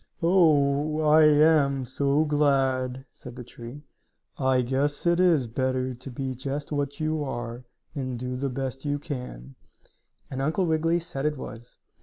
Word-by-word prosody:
"Oh, 155 -4 +3
I 155 0 +6
am 150 -3 +4
so 140 +4 +1
glad," 135 -3 +1
said 125 -2 -11
the 125 - -8
tree. 120 +4 -11 0.5
"I 130 -2 +2
guess 140 +5 -1
it 170 0 +3
is 170 -8 +4
better 130 +2 -1
to 130 +2 -10
be 130 +1 -4
just 140 +4 -5
what 145 0 -2
you 155 -1 -1
are, 120 -2 -5 0.3
and 130 -4 -4
do 125 +1 -4
the 135 +2 -2
best 135 0 -4
you 145 -1 -1
can," 125 - -7 0.8
and 135 0 -3
Uncle 160 +7 +1
Wiggily 165 +1 +1
said 160 -4 -3
it 150 -1 -2
was. 120 -2 -10
140 Hz, 155 wpm, -26 LUFS, 130-150 Hz, 0.8 s, I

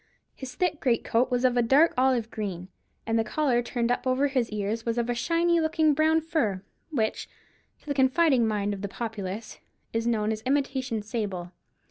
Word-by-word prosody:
His 255 -2 -9
thick 355 -1 0
greatcoat 240 0 +1
was 250 0 +1
of 250 -1 +3
a 245 - +4
dark 275 +8 +4
olive 250 -3 +1
green, 190 -4 -5 0.4
and 225 0 +1
the - - +2
collar 250 +1 +1
turned 240 0 -1
up 245 - -1
over 265 +3 +2
his 255 -4 0
ears 210 +2 -3
was 230 0 -2
of 240 0 0
a - - +1
shiny 335 +7 +1
looking 315 -1 +2
brown 315 +2 +3
fur, 260 - -1 0.3
which, 225 -8 -2 0.5
to - - -26
the 290 - -1
confiding 265 -2 +3
mind 205 -1 -1
of 195 - -6
the 200 - -3
populace, 215 -1 -6 0.3
is 225 +1 -1
known 220 -2 +1
as 215 0 -3
imitation 260 -3 -1
sable. 200 -6 -4
240 Hz, 185 wpm, -27 LUFS, 220-275 Hz, 0.5 s, a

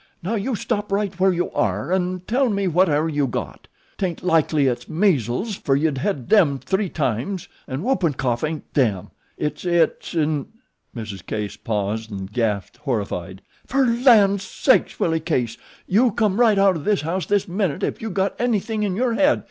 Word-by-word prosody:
Now 195 +6 -2
you 230 +3 -1
stop 205 0 -2
right 200 -1 0
where 190 +1 +4
you 175 0 -1
air 105 - 0
'n' 185 -1 -1
tell 255 +2 +2
me 200 -2 0
whatever 165 -3 +2
you 145 -3 0
got. 120 - -5 0.3
'Taint 180 -4 -2
likely 160 -4 +2
it's 125 -2 -1
measles, 165 - +1
fer 135 -7 0
you've 145 0 +1
hed 135 - -2
them 160 -10 +4
three 190 +7 -1
times, 145 - -2 0.2
'n' 135 +4 -4
whoopin' 190 - +1
cough 125 -3 -1
ain't 155 -1 -4
'them,' 110 - +1 0.3
it's 150 0 -3
'it,' 175 -1 +1
'n' 155 -3 0 0.3
." - - -40
Mrs. 105 -5 -6
Case 105 +1 -4
paused 110 +1 -3
and 95 -1 -7
gasped 105 -5 -1
horrified. 100 - -3 0.2
"Fer 270 0 +2
lan' 230 -5 +5
sakes, 190 - +1
Willie 165 -1 +1
Case, 130 -8 -1 0.3
you 230 +7 +3
come 210 -1 0
right 225 -4 +5
out 195 -3 +4
o' - - -5
this 205 +6 +1
house 165 +2 -2
this 205 -1 +1
minute 185 -4 -1
ef - - -2
you 225 - -3
got 195 0 -1
anything 225 -2 0
in 200 -3 0
your 240 +2 +1
head." 285 +5 +3
170 Hz, 180 wpm, -22 LUFS, 130-200 Hz, 0.3 s, lan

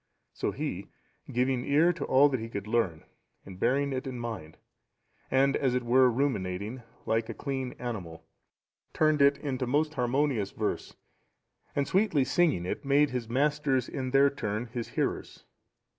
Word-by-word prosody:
So - - -2
he, - - -4 0.4
giving 125 +1 +1
ear 155 +6 +3
to - - -5
all 135 +2 +5
that 130 -3 -1
he 115 +1 -6
could 100 -3 -5
learn, 105 -8 0 0.4
and 95 -1 -11
bearing 140 +5 +1
it 130 +2 -3
in 130 -1 -5
mind, 110 -10 -6 0.7
and 135 +1 +3
as 130 -3 +1
it 125 - 0
were 125 +2 +5
ruminating, 115 -3 -2 0.2
like 115 0 0
a 115 - -5
clean 130 -2 -3
animal,(711) 95 -10 -6 0.7
turned 155 -2 +3
it 140 0 +5
into 130 -3 -3
most 150 +4 +1
harmonious 125 -5 0
verse; - - -3 0.8
and 140 -1 0
sweetly 190 -8 +2
singing 145 - +2
it, - - -4
made 140 0 +3
his 125 -3 -3
masters 135 -1 +1
in 130 -2 -4
their 135 +1 +5
turn 110 -4 -3
his 120 -2 -3
hearers. - - -3
130 Hz, 160 wpm, -29 LUFS, 115-140 Hz, 0.8 s, all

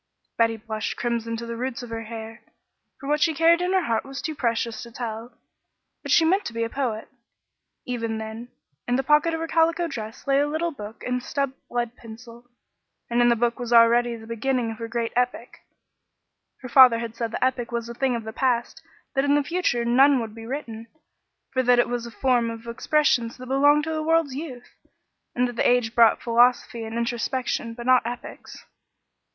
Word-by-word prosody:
Betty 230 -1 +2
blushed 220 0 -4
crimson 230 -1 -2
to 235 - -6
the 235 0 -5
roots 255 +2 -4
of 240 - -9
her 225 0 -5
hair, 225 0 -8 0.6
for 275 - -8
what 300 +1 +1
she 320 -2 +2
carried 335 +2 +4
in 360 +1 0
her 375 -1 +2
heart 230 -5 0
was 270 0 -8
too 315 - -3
precious 230 -4 -2
to 235 - -9
tell, 230 0 -6 0.6
but - - -5
she 330 - +5
meant 385 +5 +2
to 235 - -5
be 230 0 -1
a 230 - -3
poet. 235 -6 -3 0.8
Even 230 -3 -3
then, 220 +2 -7 0.4
in 245 - +1
the 265 - 0
pocket 300 +4 +3
of - - -4
her 330 - -3
calico 330 +1 +2
dress 225 -6 -7
lay 275 0 +3
a 290 - +2
little 320 +3 -1
book 215 -6 -10
and 250 0 -2
a - - -17
stubbed 275 -2 -2 0.2
lead 240 0 -2
pencil, 235 +1 -13 0.6
and 240 +1 +3
in 240 - +5
the 235 - +4
book 235 +1 0
was 245 -1 -5
already 235 0 +5
the 225 -1 -11
beginning 230 +1 -1
of 225 - -9
her 230 - -4
great 230 0 -3
epic. 245 0 -2 1.0
Her 255 - -8
father 250 -2 +8
had 230 -1 -5
said 230 -1 -3
the 230 - -1
epic 250 -2 -2
was 235 -1 -3
a 235 - -7
thing 260 0 0
of 230 - -4
the 220 0 -7
past, 255 +4 -1 0.3
that 270 - +1
in 285 0 +3
the 290 - +2
future 290 -7 0
none 265 +3 +5
would 225 -2 -5
be 225 0 -10
written, 230 -4 -6 0.7
for 260 - +2
that 245 -1 +4
it 240 - +3
was 240 -1 -3
a - - -10
form 245 -2 +1
of 230 0 -8
expressions 235 -1 +1
that 255 - -9
belonged 290 +3 +4
to 320 +1 -3
the 310 - -2
world's 325 -3 +1
youth, 260 -4 -8 0.6
and 250 0 +2
that 245 -1 -7
age 245 -2 +2
brought 230 -2 +4
philosophy 235 -1 +2
and 220 +1 -5
introspection, 235 0 -2
but 240 0 -8
not 255 0 +5
epics. 240 +1 -8
240 Hz, 210 wpm, -24 LUFS, 230-270 Hz, 1.0 s, father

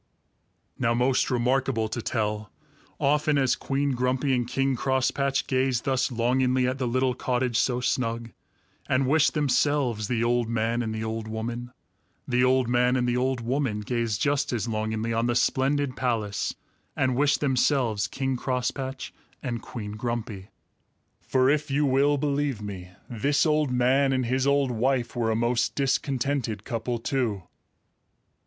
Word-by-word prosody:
Now 115 -2 +2
most 125 +2 +2
remarkable 125 -2 +1
to 115 - -3
tell, 105 -2 -2 0.5
often 150 +1 +2
as 135 -2 +2
Queen 140 +1 -1
Grumpy 130 +2 0
and 120 -2 0
King 135 +1 0
Crosspatch 135 +2 0
gazed 130 -2 0
thus 130 -1 0
longingly 125 +2 +2
at 130 +1 -2
the 125 - 0
little 130 +1 +1
cottage 125 -1 -1
so 125 -1 +1
snug, 115 -2 -1 0.6
and 130 +1 +2
wished 150 +4 +3
themselves 135 -6 +1
the 115 -1 0
old 120 -1 +1
man 115 +1 0
and 110 -2 -2
the 110 0 -3
old 110 0 -4
woman, 120 +2 -5 0.6
the 125 0 +2
old 130 -1 +3
man 125 +1 +2
and 125 -1 +1
the 120 - +1
old 130 0 0
woman 120 -3 -1
gazed 115 -1 -1
just 145 -1 +1
as 120 -2 -2
longingly 110 +1 -2
on 115 +1 +1
the 120 - 0
splendid 135 +1 +1
palace 110 -5 -1 0.4
and 130 -1 +1
wished 145 +2 +2
themselves 125 -6 +1
King 135 +3 -2
Crosspatch 130 +1 -3 0.3
and 120 -3 -3
Queen 105 -4 -7
Grumpy. 110 -3 -4 0.7
For 130 0 +2
if 150 +1 +1
you 145 +2 +2
will 140 +2 +3
believe 140 -3 -1
me, 95 -4 -7 0.2
this 140 +7 +1
old 150 -2 +2
man 130 +2 +2
and 130 -1 0
his 130 +3 0
old 140 -2 +2
wife 120 +1 0
were 115 -2 0
a 110 - +1
most 120 +1 0
discontented 135 -5 -1
couple 115 +2 -3
too! 115 - -1
125 Hz, 155 wpm, -26 LUFS, 115-135 Hz, 0.7 s, wished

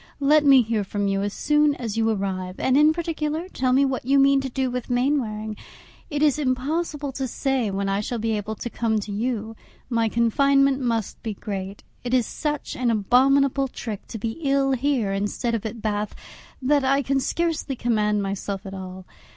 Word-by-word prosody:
Let 295 +2 +4
me 270 -3 +7
hear 220 -2 -1
from 200 +1 -2
you 195 0 0
as 205 0 -1
soon 295 +4 +2
as 225 -5 -4
you 225 0 +2
arrive, 190 -3 -3
and 260 - +2
in 300 +2 +6
particular 320 0 -2
tell 260 -8 -1
me 270 +2 +4
what 265 -2 -2
you 275 +3 +3
mean 275 0 +5
to 270 - -4
do 260 0 -1
with 250 0 -4
Mainwaring. 245 -5 0 0.5
It 295 -1 -1
is 300 -1 +3
impossible 290 +2 -1
to 265 0 -3
say 260 -2 -1
when 195 0 -2
I 195 0 0
shall 240 +3 -3
be 225 0 -1
able 210 +1 -4
to 240 - -5
come 225 -1 0
to 205 0 -6
you; 225 +1 -2 0.4
my 230 -1 +2
confinement 275 +4 +3
must 230 -4 -2
be 220 -3 -4
great. 195 0 -6 0.2
It 245 +1 0
is 245 -3 +3
such 295 +4 -3
an 250 -2 0
abominable 270 +5 +3
trick 220 -5 -7
to 225 - -6
be 225 +6 -4
ill 275 -2 +2
here 260 -6 0
instead 205 +4 -2
of 225 -1 -1
at 220 0 -8
Bath 210 -1 -2 0.5
that 285 +1 +3
I 275 +1 +2
can 270 +2 +1
scarcely 320 -1 -1
command 210 -4 +1
myself 195 0 -4
at 195 - -7
all. 185 -1 -8
245 Hz, 195 wpm, -24 LUFS, 210-275 Hz, 0.5 s, me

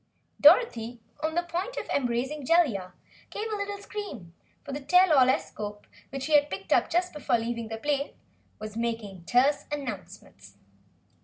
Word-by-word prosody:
Dorothy, 240 - +5 0.2
on 315 +1 -1
the 345 - +2
point 355 +8 -4
of - - -4
embracing 265 +3 -1
Jellia, 250 - +2 0.4
gave 425 - -4
a - - 0
little 405 0 -3
scream, 400 - -7 0.3
for - - -8
the 280 - -3
Tell 360 +4 +5
all 260 -3 +6
escope, 210 -5 -3 0.2
which 270 0 -5
she 305 - -1
had 295 0 +5
picked - - -2
up - - +3
just 360 +1 0
before 285 -5 +1
leaving 230 0 -3
the 225 0 -5
plane, 285 +3 -1 0.4
was 215 0 -8
making 225 -6 -4
terse 270 +7 +3
announcements. 195 - -7
265 Hz, 160 wpm, -28 LUFS, 225-320 Hz, 0.4 s, all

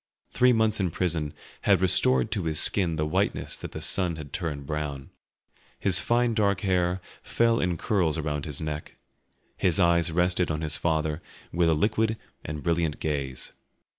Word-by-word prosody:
Three 125 0 +4
months 110 -2 +2
in 95 -2 +1
prison 80 -3 -1 0.3
had 100 -3 +3
restored 65 -8 +3
to 95 - -1
his 80 -1 0
skin 90 -5 +3
the 75 0 -1
whiteness 95 +6 -1
that - - -7
the - - -6
sun 90 -3 +1
had 75 -3 -10
turned 75 -6 -4
brown; 75 -2 -4 0.7
his 95 -2 +4
fine 120 0 +1
dark 100 -3 +1
hair 90 -2 +1 0.2
fell 115 0 +1
in 90 -2 0
curls 90 -6 0
around 75 -2 -3
his 75 -3 -4
neck, 75 -1 -5 0.6
his 90 0 +1
eyes 85 -1 +3
rested 90 +1 +1
on 80 -1 -2
his 75 -2 0
father 80 0 -1 0.3
with 85 0 +2
a 80 - +3
liquid 110 +5 +1 0.3
and 75 -1 -6
brilliant 85 -3 0
gaze. 70 -4 -3
85 Hz, 165 wpm, -26 LUFS, 75-95 Hz, 0.7 s, Three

